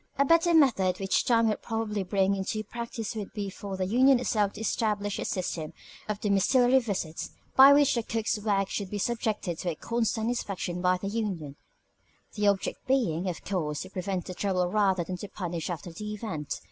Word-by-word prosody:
A 280 - +4
better 335 +3 +4
method 195 - +3
which 195 -1 +1
time 230 -2 +4
would 215 - -2
probably 225 -2 -2
bring 195 +1 +1
into 195 +3 -2
practice 230 0 -5
would 210 -3 -5
be 205 -2 -4
for 195 0 -6
the 185 - -1
union 255 +6 +5
itself 210 -5 0
to 210 - -8
establish 210 -2 -1
a - - -3
system 170 -4 -3 0.4
of 210 -1 -2
domiciliary 245 +6 +4
visits, 190 -9 -4 0.3
by 270 +1 +9
which 285 -1 +5
the 235 - 0
cook's 225 -1 -1
work 200 -2 +1
should 200 -1 -4
be 205 - -3
subjected 210 -6 -2
to 180 - -2
a 165 - -3
constant 225 +2 -1
inspection 190 -7 -3
by 180 0 +3
the 195 - -5
union 195 -10 -3 0.8
the 210 -1 0
object 200 -1 0
being, 195 -10 +1
of 175 - -6
course, 155 -6 -2
to 185 - -8
prevent 185 -1 -3
trouble 185 -3 +1
rather 195 -4 +2
than 180 +2 -5
to 205 - -7
punish 175 -4 -4
after 175 0 -5
the 210 +5 -6
event. 165 -10 -4
205 Hz, 190 wpm, -28 LUFS, 185-225 Hz, 0.8 s, by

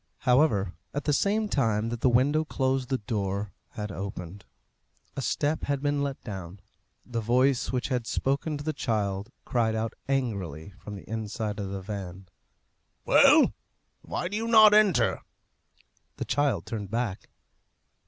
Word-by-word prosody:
However, 125 - +3 0.2
at 145 - -1
the 150 - +1
same 210 +7 +1
time 115 - +1
that 120 -1 -5
the 130 - +4
window 140 +6 +3
closed 130 -4 -1
the 130 - +1
door 100 -2 -3 0.2
had 105 -3 -5
opened; 95 -1 -7 0.7
a - - -3
step 150 +4 0
had 140 -1 0
been 145 0 +1
let 140 -1 -2
down; 95 -3 -7 0.5
the 115 -2 -3
voice 125 +3 +2
which 125 0 -1
had 125 -3 -1
spoken 140 +3 -1
to 145 - -7
the 155 +1 -1
child 105 -5 -1 0.2
cried 115 -3 +1
out 110 0 -2 0.2
angrily 100 - -2
from 105 - -8
the 100 - -11
inside 110 -1 -3
of 100 -1 -3
the 95 -1 -5
van, 95 -2 -6 0.8
"Well! - - +6 0.5
why - - -3
do 195 - -4
you 225 +2 -2
not 215 -2 +8
enter?" 210 -4 +4 1.0
The - - -3
child 135 - +1
turned 105 -4 -5
back. 115 -3 -3
115 Hz, 155 wpm, -27 LUFS, 100-140 Hz, 1.0 s, not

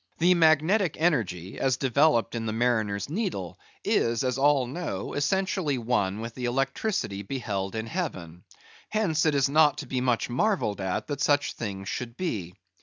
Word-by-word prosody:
The 175 +2 +5
magnetic 165 +2 +3
energy, 105 - 0
as 130 -2 +1
developed 135 -2 +2
in 115 -1 -3
the 110 - -1
mariner's 110 -4 0
needle, 155 - -3 0.2
is, 115 +1 +1
as 130 0 -1
all 140 -2 +4
know, 130 - -4
essentially 185 -1 0
one 110 -4 0
with 115 0 -6
the 125 0 -5
electricity 135 - -1
beheld 100 -3 -3
in 110 0 -2
heaven; 95 - -5 0.5
hence 165 -8 +1
it 150 - +2
is 140 -1 +3
not 150 0 +4
to 150 - -5
be 130 -1 -2
much 125 -2 +1
marvelled 125 - 0
at, 95 -1 -2
that 145 -1 -4
such 145 -1 +2
things 95 -3 -5
should 115 +2 -5
be. 100 - -3
130 Hz, 165 wpm, -27 LUFS, 110-155 Hz, 0.5 s, The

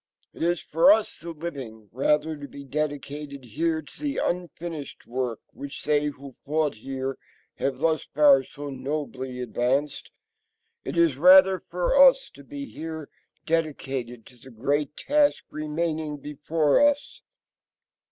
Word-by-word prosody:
It - - -12
is 170 0 +1
for 165 +5 +5
us 215 0 +2
the 170 - -8
living, 135 -10 -7
rather, 150 +5 +1
to 145 -1 -8
be 140 - -10
dedicated 140 -1 -4
here 160 +7 -1
to 140 - -15
the 290 -2 -2
unfinished 170 -4 -4
work 125 -2 -3
which 140 0 -8
they 150 0 +2
who 140 -2 -8
fought 150 0 0
here 135 +4 -5 0.4
have 135 -2 -1
thus 160 +2 +1
far 145 -2 +5
so 145 +1 -8
nobly 130 -1 -4
advanced. 125 +4 -1 0.7
It - - -5
is 165 -6 +4
rather 185 +3 +7
for - - -1
us - - +6
to - - -14
be 285 -1 -7
here 160 - -7 0.4
dedicated 135 -7 -2
to 125 - -17
the 125 +3 -15
great 140 +5 -1
task 295 0 +2
remaining 155 0 -2
before 150 - +1
us. 290 +12 +1
150 Hz, 140 wpm, -26 LUFS, 135-165 Hz, 0.7 s, rather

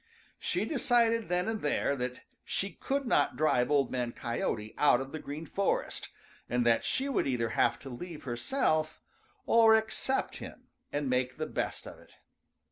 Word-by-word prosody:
She - - 0
decided 235 - +2
then 180 +1 +1
and 225 -1 -2
there 145 -1 +1
that 125 -1 -4 0.2
she 195 0 -2
could 275 +10 -2
not 145 -12 +2
drive 145 -5 +2
Old 140 -3 +2
Man 125 -2 -2
Coyote 110 -2 -3
out 145 -4 +4
of 135 0 -6
the 155 - -5
Green 150 +3 -6
Forest 200 +4 -1 0.4
and 120 0 +1
that 115 -1 +4
she 270 - 0
would 275 - 0
either 120 -3 0
have - - +2
to 135 - -10
leave 160 +5 -8
herself 155 - 0 0.5
or 225 -1 +6
accept 220 +4 -1
him - - -10 0.2
and 145 -1 -1
make 130 0 0
the 155 - -2
best - - -3
of - - -10
it. - - -19
150 Hz, 170 wpm, -31 LUFS, -, 0.5 s, or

